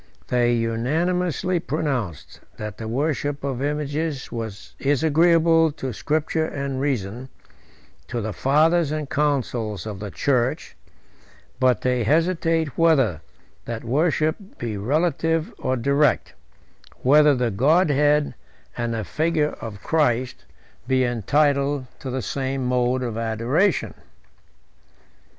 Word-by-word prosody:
They 120 -1 +2
unanimously 165 +10 0
pronounced, 135 - -3 0.2
that 105 -1 -6
the 110 - -5
worship 145 +3 -1
of 135 -2 -3
images 150 0 -2 0.5
is 140 +1 +1
agreeable 165 0 +4
to 130 -3 -5
Scripture 155 +5 -1
and 140 -3 -3
reason, 125 -2 -2 0.8
to 120 - -3
the 110 -1 -3
fathers 155 - +3
and 155 -2 -3
councils 125 - -1
of 105 -3 -6
the 105 0 -5
church: 125 +3 -1 0.8
but 130 -3 +3
they 125 -1 +1
hesitate 165 - +1
whether 135 - +3 0.4
that 115 -1 -5
worship 155 - 0
be 115 -3 -4
relative 160 - 0
or 130 - -1
direct; 140 +2 +1 0.7
whether 150 +2 +6
the 125 -2 0
Godhead, 150 - +3 0.4
and 120 -1 -2
the 110 - -2
figure 155 +1 0
of 105 -4 -8
Christ, 130 -6 0 0.4
be 130 0 +2
entitled 140 +4 +1
to 135 - -6
the 130 -1 -3
same 135 -1 -2
mode 125 0 +1
of 115 -2 -3
adoration. 115 - 0
140 Hz, 115 wpm, -23 LUFS, 120-155 Hz, 0.8 s, whether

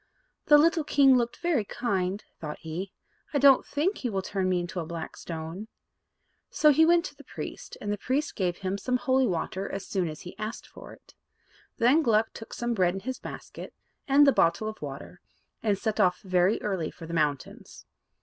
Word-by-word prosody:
"The 295 - +8
little 325 +1 +3
king 275 -2 +5
looked 240 -1 0
very 325 -10 +2
kind," 195 -3 -2 0.2
thought 150 -2 -6
he. 170 +4 -5 0.4
"I - - +5
don't 275 -1 +6
think 335 +8 -1
he 250 - -2
will 195 -3 -2
turn 190 -1 -1
me 180 -1 +2
into 175 +1 -4
a 165 - -3
black 165 -1 -6
stone." 165 +5 -7 0.8
So 300 - +4
he 320 +3 +5
went 345 0 +4
to - - -8
the - - -14
priest, - - -8
and 205 0 -2
the 205 - -5
priest 280 +7 -1
gave 180 -3 -1
him 195 +1 -3
some 250 +4 0
holy 260 0 +2
water 190 +1 -3
as 195 0 -5
soon 185 -3 -1
as 155 -1 -7
he 180 - -10
asked 215 +1 -5
for - - -12
it. - - -17 0.6
Then 255 +8 +4
Gluck 225 -5 +2
took 225 - -10
some 240 0 -2
bread 185 -4 +2
in 195 - -5
his 260 +3 -5
basket, - - -9 0.3
and 285 +1 +6
the 275 - +6
bottle 170 0 +2
of 215 - -7
water, 145 +5 -8 0.4
and 210 -3 +1
set 220 +1 -2
off 180 -3 +3
very 185 +1 +2
early 185 -6 -1
for 165 - -11
the 165 - -7
mountains. 150 -4 -3
205 Hz, 200 wpm, -27 LUFS, 180-260 Hz, 0.8 s, The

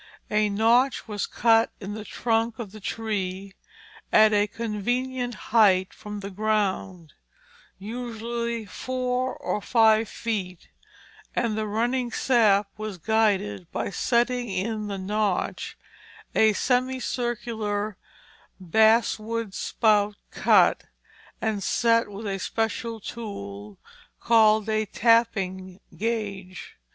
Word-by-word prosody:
A 210 0 +2
notch 235 +6 +2
was 210 -2 -3
cut 225 0 +3
in 200 0 -6
the 215 0 -6
trunk 225 0 -1
of 220 -5 -6
the 215 - -11
tree 195 -3 -3 0.6
at 215 0 +6
a 205 0 +3
convenient 245 +3 -2 0.2
height 190 -5 +4
from 210 -1 -8
the 200 0 -6
ground, 195 -5 -1 0.6
usually 235 +1 -4
four 255 +4 -2
or 210 - -3
five 220 -1 +4
feet, 190 -6 -4 0.7
and 230 -3 0
the 215 0 -2
running 240 +4 0
sap 215 -6 +3
was 215 -3 -5
guided 190 - 0
by - - -3
setting 240 +2 +1
in 210 +3 -2
the 200 -1 -4
notch 205 0 -2 0.6
a 220 -1 +4
semicircular 240 -4 -1 0.6
basswood 220 +2 +2
spout 210 -2 +2 0.2
cut - - +4 0.5
and 220 -3 -1
set 230 +3 +2
with 205 +2 -8
a 195 -1 -2
special 225 +2 -2
tool 105 - -8 0.4
called 220 -2 +4
a 215 -1 0
tapping 195 -6 +1 0.2
gauge. 200 - -4
215 Hz, 105 wpm, -25 LUFS, 200-230 Hz, 0.7 s, at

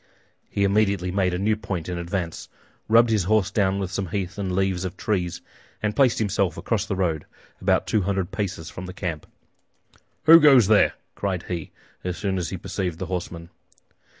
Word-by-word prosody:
He 100 - 0
immediately 100 -2 +2
made 95 -1 +1
a 90 - -1
new 105 +4 +1
point 95 -6 -5
in 90 -1 -3
advance, 85 -1 -4 0.4
rubbed 115 +1 +5
his 105 -5 +2
horse 105 -1 +2
down 100 -2 +1
with 95 -2 -3
some 95 -1 -2
heath 95 +2 -4
and 95 -2 -2
leaves 95 -2 0
of 90 -2 -5
trees, 90 -5 -2 0.4
and 105 0 0
placed 130 -2 +4
himself 100 -5 0
across 110 -2 -1
the 100 - -1
road, 85 -5 -1 0.3
about - - +2
two 110 - +1
hundred 95 -1 -1
paces 95 -6 -3
from 90 +2 -8
the 90 - -7
camp. 85 -6 -5 1.0
"Who 165 +1 +9
goes 140 -7 +7
there?" 105 +1 +4 0.2
cried 95 -4 -2
he, 85 -3 -4 0.3
as 90 -2 -3
soon 95 -2 -1
as 85 - -3
he 95 - -4
perceived 95 -2 -3
the - - -4
horsemen. 85 -1 -5
95 Hz, 185 wpm, -24 LUFS, 90-105 Hz, 1.0 s, Who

